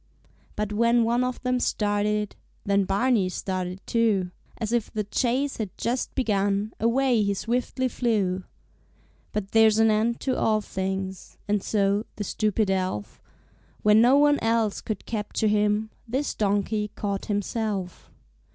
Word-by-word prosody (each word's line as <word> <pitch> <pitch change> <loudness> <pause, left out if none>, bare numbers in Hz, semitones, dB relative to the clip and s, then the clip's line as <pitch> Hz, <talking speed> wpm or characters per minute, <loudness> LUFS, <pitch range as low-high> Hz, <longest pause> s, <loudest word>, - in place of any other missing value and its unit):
But 210 0 -2
when 235 +2 +3
one 235 +2 +2
of 250 0 -2
them 250 0 +1
started, 210 -1 0 0.3
Then 200 -1 +2
Barney 200 0 +2
started 185 0 -4
too; 210 -6 +1 0.3
As 225 0 -3
if 235 -3 0
the 215 - -2
chase 255 +6 0
had 215 -4 -3
just 245 +2 -2
begun, 205 -3 0
Away 240 0 +2
he 200 -1 +1
swiftly 250 +4 -1
flew. 205 -7 0 0.9
But 200 -2 -3
there's 220 -1 +5
an 225 0 +5
end 225 +2 +1
to 260 -2 0
all 215 -1 +2
things, 190 -1 -4
And 205 -1 +1
so, 200 +1 +1
the 210 - -4
stupid 210 0 0
elf, 185 - -3 0.6
When 210 +1 +6
no 250 +4 +6
one 290 0 +4
else 225 -2 +1
could 215 -4 -5
capture 215 0 -2
him 210 +1 +1 0.2
This 265 +5 -1
donkey 210 +1 0
caught 200 -1 -3
himself. 205 -2 -3
210 Hz, 140 wpm, -25 LUFS, 200-235 Hz, 0.9 s, When